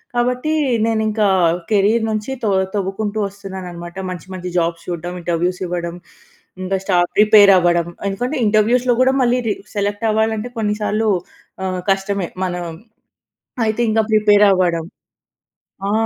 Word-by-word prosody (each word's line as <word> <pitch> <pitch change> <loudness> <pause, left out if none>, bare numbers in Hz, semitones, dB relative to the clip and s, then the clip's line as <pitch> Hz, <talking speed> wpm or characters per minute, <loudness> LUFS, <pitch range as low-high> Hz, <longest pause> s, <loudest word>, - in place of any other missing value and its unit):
కాబట్టి, 250 +5 0 0.3
నేనింక 220 -1 0 0.5
కెరీర్ 215 +2 +3
నుంచి 215 +4 -3
తో 215 - +1 0.2
తోవ్వుకుంటూ 205 +2 -2
వస్తున్నాననమాట. 190 -3 -8
మంచి, 180 -1 -7
మంచి 180 0 -5
జాబ్స్ 170 0 -1
చూడ్డం, 175 0 -4
ఇంటర్వ్యూస్ 175 +2 -1
ఇవ్వడం, 175 -1 -4 0.7
ఇంకా 190 +1 0
స్టా 185 -3 +2 0.2
ప్రిపేర్ 210 -1 +7
అవ్వడం. 175 -1 +2 0.2
ఎందుకంటే 245 +9 -3
ఇంటర్వ్యూస్‌లో 235 +4 +3
కూడా, 260 +1 +4
మళ్ళీ 245 +1 +2
రి 205 - 0 0.2
సెలెక్ట్ 205 +1 -1
అవ్వాలంటే 220 +2 -1
కొన్నిసార్లు 215 +1 0 0.6
ఆహ్, 185 -1 -2
కష్టమే. 195 -2 -1 0.2
మనం 180 -1 -3 1.0
అయితే 220 +2 -1
ఇంకా 220 0 +3
ప్రిపేర్ 210 -1 +5
అవ్వడం. 175 -3 +1 1.1
ఆ! - - 0
205 Hz, 125 wpm, -19 LUFS, 180-220 Hz, 1.1 s, ప్రిపేర్